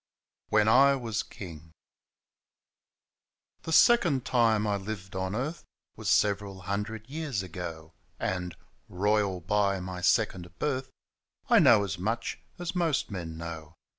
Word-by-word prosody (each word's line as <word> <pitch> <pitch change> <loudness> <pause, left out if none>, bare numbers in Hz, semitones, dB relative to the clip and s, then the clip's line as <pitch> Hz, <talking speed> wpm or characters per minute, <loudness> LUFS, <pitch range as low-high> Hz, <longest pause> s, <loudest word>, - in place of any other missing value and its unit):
WHEN 105 0 +3
I 135 +5 +6
WAS 115 -5 -2
KINO 80 -4 -10 2.0
Thb 160 - -4
second 165 - +5
time 115 -4 +3
I 105 -1 +1
lived 100 -1 -6
on 95 +1 -2
earth 150 +8 -3 0.3
Was - - -4
several 100 -2 +1
hundred 105 +4 -4
years 140 -8 -3
ago; 85 -3 -7 0.3
And 90 -1 -2 0.2
— - - -39
^royal 100 -2 0
by 100 -1 +2
my 90 0 -6
second 90 -4 +1
birth 130 - -2 0.3
— - - -37
I - - +8
know 110 -3 +6
as 95 -3 -4
much 115 +5 -2 0.2
as 175 -1 -4
most 165 -10 0
men 85 -4 -5
know. 80 -1 -7
100 Hz, 135 wpm, -28 LUFS, 90-120 Hz, 2.0 s, I